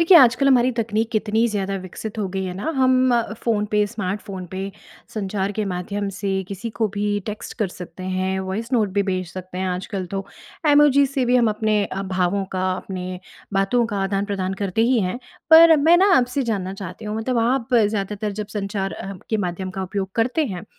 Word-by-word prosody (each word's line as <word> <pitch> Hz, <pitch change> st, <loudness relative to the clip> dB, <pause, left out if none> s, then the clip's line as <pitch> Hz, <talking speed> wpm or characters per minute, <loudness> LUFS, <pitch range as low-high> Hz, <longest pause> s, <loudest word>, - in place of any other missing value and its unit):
देखिए 335 Hz, +2 st, +7 dB
आजकल 255 Hz, 0 st, +5 dB
हमारी 255 Hz, -1 st, +5 dB
तकनीक 225 Hz, -1 st, -1 dB
कितनी 220 Hz, +1 st, +2 dB
ज़्यादा 195 Hz, -2 st, -2 dB
विकसित 210 Hz, +4 st, -7 dB
हो 205 Hz, -, 0 dB
गई 190 Hz, 0 st, -3 dB
है 185 Hz, -, -3 dB
ना 205 Hz, -, -3 dB
हम 255 Hz, -1 st, +4 dB
अ, 235 Hz, -2 st, 0 dB
फ़ोन 220 Hz, -2 st, 0 dB
पे 210 Hz, -1 st, +3 dB
स्मार्ट 205 Hz, -2 st, -3 dB
फ़ोन 190 Hz, -2 st, -7 dB
पे 190 Hz, -, -4 dB, 0.5 s
संचार 200 Hz, -1 st, -2 dB
के 215 Hz, +1 st, -2 dB
माध्यम 200 Hz, +3 st, -3 dB
से 195 Hz, -1 st, -1 dB
किसी 200 Hz, +4 st, -5 dB
को 220 Hz, -2 st, +2 dB
भी 205 Hz, 0 st, -1 dB, 0.2 s
टेक्स्ट 210 Hz, -1 st, -6 dB
कर 210 Hz, -5 st, +1 dB
सकते 180 Hz, 0 st, -10 dB
हैं, 185 Hz, 0 st, -1 dB
वॉइस 205 Hz, +6 st, -4 dB
नोट 220 Hz, -5 st, +3 dB
भी 200 Hz, -, +4 dB
भेज 185 Hz, -2 st, -2 dB
सकते 185 Hz, -1 st, -7 dB
हैं 190 Hz, 0 st, -1 dB
आजकल 185 Hz, +1 st, -3 dB
तो। 195 Hz, 0 st, -2 dB, 0.5 s
इमोजी 290 Hz, -1 st, +6 dB
से 270 Hz, -1 st, -1 dB
भी 245 Hz, +1 st, +3 dB
हम 235 Hz, -2 st, +4 dB
अपने 215 Hz, -1 st, +1 dB
अ, 195 Hz, 0 st, -4 dB
भावों 190 Hz, +1 st, 0 dB
का 185 Hz, 0 st, 0 dB
अपने 185 Hz, -1 st, -5 dB, 0.4 s
बातों 195 Hz, +5 st, +2 dB
का 205 Hz, -3 st, -3 dB
आदान-प्रदान 195 Hz, -1 st, -1 dB
करते 200 Hz, +3 st, +1 dB
ही 255 Hz, -, +4 dB
हैं। 185 Hz, +6 st, -2 dB, 0.3 s
पर 325 Hz, 0 st, +9 dB
मैं 320 Hz, +4 st, +5 dB
ना 400 Hz, -, +4 dB
आपसे 250 Hz, +2 st, +1 dB
जानना 195 Hz, -6 st, -2 dB
चाहती 185 Hz, +4 st, -8 dB
हूँ 210 Hz, 0 st, -3 dB
मतलब 235 Hz, +2 st, -1 dB
आप 250 Hz, 0 st, 0 dB
ज़्यादातर 210 Hz, -2 st, +1 dB
जब -, -, -9 dB
संचार 195 Hz, -1 st, -2 dB
अ, 195 Hz, -, -6 dB, 0.2 s
के 220 Hz, -, +2 dB
माध्यम 185 Hz, +2 st, -4 dB
का 190 Hz, 0 st, -4 dB
उपयोग 190 Hz, 0 st, -3 dB
करते 250 Hz, +8 st, +1 dB
हैं 180 Hz, -, -7 dB
205 Hz, 205 wpm, -22 LUFS, 190-235 Hz, 0.5 s, पर